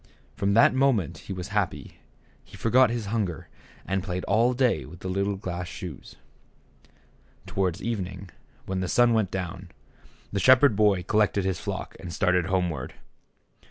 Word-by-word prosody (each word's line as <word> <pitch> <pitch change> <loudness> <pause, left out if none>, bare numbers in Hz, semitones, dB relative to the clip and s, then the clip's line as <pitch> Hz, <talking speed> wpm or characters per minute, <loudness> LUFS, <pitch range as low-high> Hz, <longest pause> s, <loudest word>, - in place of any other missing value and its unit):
From 100 0 0
that 115 - +6
moment 130 - +1
he - - -3
was 90 0 -5
happy; 105 -2 -3 0.4
he - - -14
forgot 125 +2 +4
his 115 -2 -3
hunger, 95 -8 -2 0.4
and 95 0 -1
played 90 -1 -4
all 115 +5 +2
day 120 - +2
with 85 +7 -12
the - - -5
little 100 +2 -1
glass 90 -2 -5
shoes. 85 -5 -9 1.3
Towards 95 -3 -2
evening, 100 -5 -4 0.3
when 95 0 -3
the 95 - -2
sun 120 +4 +4
went 110 -4 +1
down, 95 0 -5 0.6
the 100 - -1
shepherd 130 +1 +6
boy 100 -3 +3
col 105 +4 +1
lected 105 -2 +2
his 95 -3 -1
flock - - -5
and 85 - -7
started 90 0 +1
homeward. 90 -8 -2
95 Hz, 160 wpm, -26 LUFS, 90-110 Hz, 1.3 s, that